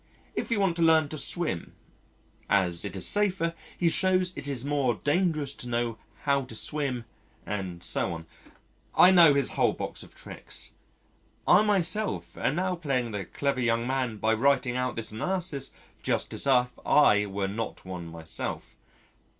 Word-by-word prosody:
If - - -3
you 230 -3 +1
want 190 -4 +2
to - - -1
learn 160 -2 +4
to 155 - -5
swim 160 - 0 0.7
as 90 -4 +2
it 100 - -5
is 95 - +1
safer, 190 -5 +2 0.2
he 175 - +1
shows 185 +1 +2
it 140 - -4
is 135 -2 -3
more 140 -5 +1
dangerous 150 - 0
to 125 - -7
know 120 -1 -1 0.2
how 140 -1 +2
to 115 - -10
swim 130 -2 -1 0.4
and 95 -4 -5
so - - -1
on. 80 -1 -6 0.7
I 180 - +8
know 170 -6 +7
his 140 -2 +2
whole - - +2
box - - -6
of - - -14
tricks. - - -6 0.8
I 180 - +7
myself 210 0 0
am 150 - -1
now 185 +1 -1
playing 130 -7 -1
the 100 -3 -4
clever 140 +3 -2
young 115 -1 +1
man 130 -3 -1
by 110 +2 +1
writing 125 +1 +2
out 125 -1 -1
this 115 -1 -3
analysis 155 - -2 0.3
just - - -1
as - - -2
if 125 -2 +2
I 105 -8 +4
were 100 0 -2
not 110 +1 -5
one 90 -2 -6
myself. 80 -1 -6
135 Hz, 165 wpm, -27 LUFS, 110-165 Hz, 0.8 s, I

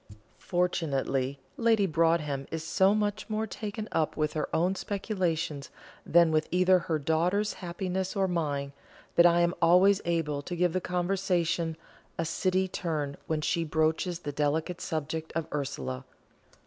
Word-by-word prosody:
Fortunately 140 -6 0 0.2
Lady 225 -3 +3
Broadhem 160 -5 +1
is 160 -1 -4
so 190 +5 +3
much 210 0 -1
more 215 +1 -1
taken 215 0 -5
up 155 -2 0
with 150 -1 0
her 155 - -2
own 180 +3 +2
speculations 180 -8 -2 0.4
than 170 -1 +5
with 155 0 +1
either 185 +1 +4
her 165 -2 -1
daughter's 170 +8 +1
happiness 185 +2 -3
or 195 -1 +2
mine, 145 -6 -1 0.4
that 170 0 +7
I 170 0 +4
am 170 0 +2
always 180 +4 +5
able 160 -4 -1
to 175 +5 -5
give 175 -1 +1
the 185 - 0
conversation 175 -3 0 0.4
a 165 - -1
City 185 +3 +1
turn 155 -6 -3
when 155 -1 -1
she 165 +2 0
broaches 160 +3 0
the 145 - -4
delicate 155 +4 -1
subject 160 +1 -3
of 165 -1 -1
Ursula. 135 -3 -3
170 Hz, 150 wpm, -29 LUFS, 155-185 Hz, 0.4 s, that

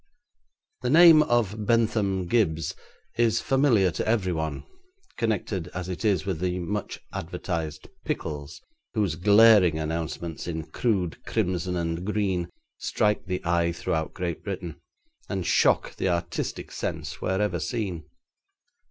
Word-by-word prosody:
The - - -1
name 165 -2 +8
of 110 -6 0
Bentham 110 -5 +2
Gibbes 85 -8 +1 0.5
is 115 -2 +3
familiar 130 -9 +3
to - - -3
everyone, 90 -9 -1 0.5
connected 105 -5 -1
as 90 0 -4
it 90 - -5
is 100 -6 +2
with 95 -5 -2
the 90 0 -1
much 100 +3 -4
advertised 80 -3 -4 0.2
pickles, 75 -1 -4 0.4
whose 100 -7 +1
glaring 100 -1 +6
announcements 80 +1 -4
in 80 -2 -3
crude 95 -1 -1
crimson 90 0 -1
and 85 0 -2
green 95 -4 -1 0.3
strike 105 0 0
the 90 -1 -3
eye 85 0 +2
throughout 80 -1 -2
Great 85 -3 -3
Britain, 90 -5 -5 0.5
and 95 -3 -2
shock - - +3
the 95 - 0
artistic 85 -1 -3
sense - - -4
wherever 95 -1 0
seen. 95 - -3
90 Hz, 125 wpm, -26 LUFS, 85-105 Hz, 0.5 s, name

